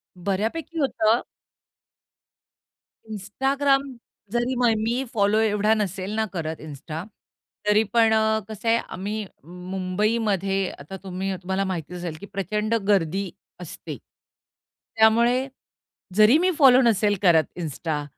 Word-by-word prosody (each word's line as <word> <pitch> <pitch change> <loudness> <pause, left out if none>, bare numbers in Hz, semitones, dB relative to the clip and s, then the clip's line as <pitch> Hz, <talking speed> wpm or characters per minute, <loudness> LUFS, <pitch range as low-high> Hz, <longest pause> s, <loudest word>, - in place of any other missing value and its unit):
बऱ्यापैकी 220 - -3
होतं. 230 -4 +2 1.9
Instagram 270 +6 0 0.3
जरी 240 +2 0
मय 240 -2 +3
मी 230 +4 -1
फॉलो 210 0 +2
एवढा 210 0 +2
नसेल 195 -2 -2
ना 220 - +1
करत 160 -3 -4
इन्स्टा, 155 +2 -7 0.6
तरी 210 +1 +4
पण 225 -1 +5
अ, 220 0 +2
कसं 215 +1 -7
आहे, 230 - +5
आम्ही 210 +1 -4 0.2
मुंबईमध्ये 195 +2 -1
आता 155 +7 -8
तुम्ही 190 +1 -3
तुम्हाला 190 +1 -1
माहिती 180 -2 -4
असेल, 175 -3 -5
की 200 - -9
प्रचंड 210 +3 -2
गर्दी 190 -1 +1 0.3
असते. - - -8 1.0
त्यामुळे 235 +4 +4 0.7
जरी 215 +7 +6
मी 365 +2 +2
फॉलो 265 -3 +7
नसेल 210 -3 +3
करत 165 -4 +5
इन्स्टा, 155 -2 -3
210 Hz, 115 wpm, -24 LUFS, 185-230 Hz, 1.9 s, फॉलो